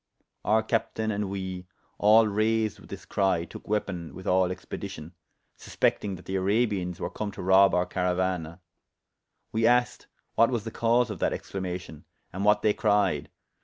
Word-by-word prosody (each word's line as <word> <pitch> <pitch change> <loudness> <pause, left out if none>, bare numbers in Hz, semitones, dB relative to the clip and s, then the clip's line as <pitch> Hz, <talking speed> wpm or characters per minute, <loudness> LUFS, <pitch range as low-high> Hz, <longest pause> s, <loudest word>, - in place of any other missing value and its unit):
Our 110 +1 +3
captayne 110 -1 -1
and 100 -1 -2
we, 95 -2 -5 0.3
all 110 +2 +6
raysed 110 0 0
with - - -16
this - - -8
crye, 95 -4 +1
tooke - - -11
weapon 95 -5 -3
with 95 - -10
all 95 0 +3
expedition, 85 -2 -7 0.5
suspectyng 100 -2 0
that 90 - -13
the 95 - -2
Arabians 95 -3 0
were - - -3
come 110 - -4
to - - -7
rob 95 0 +5
our 90 0 +2
carauana; 90 -2 -2 0.9
we 110 +1 +2
asked 125 0 +2 0.3
what 115 - +4
was 120 -5 -1
the 115 - -6
cause 115 +1 +2
of 100 - -6
that - - +1
exclamation, 90 -4 -6 0.3
and 95 +2 -3
what 105 0 +3
they 105 - +4
cryed? 100 -10 +1
100 Hz, 165 wpm, -27 LUFS, 90-110 Hz, 0.9 s, all